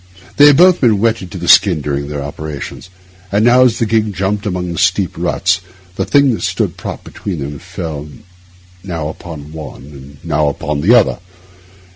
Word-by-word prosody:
They 145 - +8
had 145 -2 +6
both 180 0 +5
been 115 -5 +4
wetted 110 -4 0
to 95 - -8
the 85 0 -5
skin 90 -4 +5
during 70 -1 -3
their 75 -1 -4
operations, 75 +4 -7 0.4
and 105 +3 +2
now, 125 +1 +5
as 120 -3 +2
the 115 - 0
gig 110 -2 0
jumped 100 +3 -2
among 90 -2 -3
the 85 +1 +3
deep 95 -4 -3
ruts, 90 - 0 0.3
the - - -1
thing 140 -3 +3
that - - -4
stood - - -1
propped - - -7
between 95 -4 -6
them 70 0 -6
fell 75 -2 -6 0.7
now 85 -5 -4
upon 80 -3 -9
one 80 -4 -9
and 70 0 -13
now 75 -1 0
upon 75 +1 -3
the 110 +10 +5
other. 115 -7 +3
90 Hz, 185 wpm, -15 LUFS, 75-110 Hz, 0.7 s, They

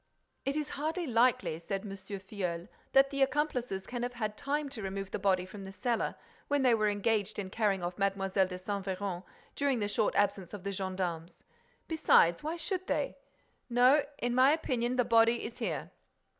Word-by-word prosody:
"It 275 +2 0
is 300 -1 -2
hardly 320 +5 -2
likely," 245 - +2
said 195 +3 -3
M. 205 -1 -7
Filleul, 190 -3 -5 0.3
"that 270 0 +6
the 275 -1 -2
accomplices 260 -8 0
can 245 -1 -4
have 245 +1 -2
had 215 -3 -2
time 285 +2 -1
to 245 -5 -6
remove 195 0 -4
the - - -2
body 190 -2 +2
from 195 +1 -9
the 190 - -7
cellar, 235 +4 -1 0.3
when 285 -1 +1
they 250 -2 +5
were 215 -2 +3
engaged 210 0 0
in 190 -2 -4
carrying 200 -4 +1
off 175 +3 -4
Mlle. 195 0 +1
de 190 -1 +1
Saint 200 +2 -3
Véran—during 195 +8 -3
the 205 - 0
short 205 +1 0
absence 200 -2 +1
of 195 - -10
the 200 - -2
gendarmes. 185 -3 -4 0.4
Besides, 305 - +4
why 315 +3 -3
should 365 +3 -2
they?—No, 265 - +1
in 245 0 -1
my 260 +3 +6
opinion, 250 -6 0
the 250 -1 +2
body 230 +1 +4
is 230 - -7
here." - - -3
215 Hz, 180 wpm, -31 LUFS, 195-260 Hz, 0.4 s, that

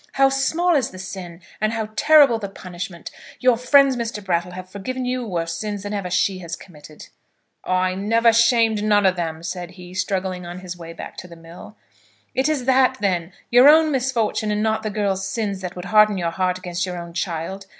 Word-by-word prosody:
How 270 0 +4
small 320 +6 +1
is 265 -5 +1
the 185 - -12
sin, 185 -2 -8 0.2
and 215 +1 +1
how 220 -1 -3
terrible 285 -4 +5
the 200 -2 -5
punishment! 180 -2 -8 0.3
Your 250 -1 +4
friends, 270 +3 +4
Mr. 230 -4 -4
Brattle, 180 -1 -1
have 185 0 -8
forgiven 250 +7 -5
you 250 -1 -2
worse 165 -3 -2
sins 205 -2 -4
than 205 0 -5
ever 200 -3 -3
she 185 +1 +1
has 170 -2 -6
committed." 155 -3 -14 0.5
"I 185 0 +1
never 225 +4 +3
shamed 230 -2 +3
none 205 -1 +3
of 185 -1 +4
them," 165 -2 -4
said 175 0 -5
he, 180 0 -11
struggling 185 -1 -2
on 175 +1 -8
his 180 -1 -7
way 165 -1 -9
back - - -9
to 180 - -8
the 170 - -12
mill. 165 +5 -13 0.6
"It 265 +3 +1
is 285 -5 -1
that, 260 0 +3
then; 185 -4 -1 0.2
your 250 +4 +8
own 315 0 +6
misfortune 245 -5 0
and 210 0 0
not 220 0 0
the 215 - -3
girl's 195 -2 -1
sin 200 -1 -3
that 185 -1 -6
would 180 0 -7
harden 210 -1 +4
your 170 -2 -1
heart 185 +1 -1
against 180 -1 -4
your 180 -1 -4
own 170 -1 -8
child? 175 +3 -4
195 Hz, 205 wpm, -22 LUFS, 180-230 Hz, 0.6 s, your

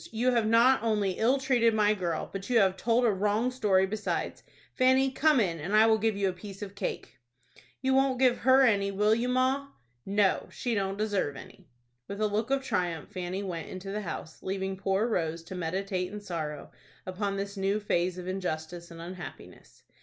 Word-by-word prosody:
You 240 +3 +1
have 230 -3 +2
not 235 +4 +5
only 210 -4 +1
ill 245 +5 +3
treated 245 -4 +2
my 210 -1 +4
girl, 175 -5 -2
but 195 +2 -6
you 245 - +3
have 190 -3 +4
told 235 +4 +2
a 225 - +4
wrong 210 +5 0
story 200 -7 +2
besides. 210 +2 -3 0.3
Fanny, 260 +1 +3
come 300 0 +3
in, 170 -7 0
and 185 +8 -2
I 215 +1 +7
will 220 -1 +4
give 220 -1 0
you 200 -1 +1
a 185 - -1
piece 195 +2 -9
of 200 -1 -8
cake." 170 -8 -5 0.6
"You 265 0 +2
won't 265 -1 +3
give 250 -1 +3
her 260 +2 +5
any, 200 -5 +3
will 210 +2 +2
you, 235 +2 0
ma?" 260 +2 +1 0.4
"No, 200 -1 +1
she 245 - -3
don't 195 -2 -1
deserve 205 -9 -1
any." - - -13 0.4
With 200 +1 -6
a 215 - +2
look 215 +3 -1
of 270 0 +1
triumph 175 - -2
Fanny 185 +2 -4
went 170 -4 -5
into 190 +1 -7
the 210 +1 -3
house, 160 -4 -7
leaving 190 0 -3
poor 195 +2 0
Rose 165 -6 -2
to 175 - -9
meditate 185 +1 -2
in 210 - -6
sorrow 160 -7 -5 0.3
upon 195 +2 -3
this 200 +1 -4
new 195 +2 0
phase 180 -3 0
of 180 0 -7
injustice 175 -2 -4
and 165 -1 -11
unhappiness. 175 0 -10
200 Hz, 200 wpm, -29 LUFS, 185-230 Hz, 0.6 s, I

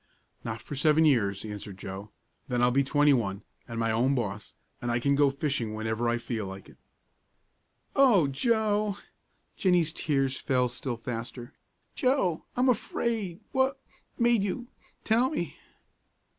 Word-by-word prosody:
"Not 110 -1 -5
for - - -8
seven 155 +3 +4
years," 105 -9 +2
answered 105 -2 -7
Joe; 95 +2 -7 0.4
"then 120 -1 0
I'll 125 - +5
be 135 +2 +3
twenty 145 +1 +4
one, 100 -5 -1 0.2
an' 115 - -6
my 115 0 +1
own 125 +5 +2
boss, 105 -4 -4 0.3
and 120 - -2
I 120 0 +1
can 140 +3 +2
go 140 0 +4
fishing 135 -6 -2
whenever 110 +2 -1
I 120 - +1
feel 115 -4 -4
like 95 0 -9
it." - - -18 1.2
"O 240 - +6
Joe!" 210 - +1 0.6
Jennie's 175 -4 +2
tears 135 -3 0
fell 125 -2 +1
still 120 0 -4
faster. 120 +2 -6 0.4
"Joe! 250 - +1
I'm 250 +1 +3
afraid 220 -5 -1
what 265 +1 +1 0.4
made 235 -3 +4
you 220 +5 -3 0.3
tell 235 +4 +3
me?" 175 - -4
135 Hz, 145 wpm, -28 LUFS, 115-195 Hz, 1.2 s, O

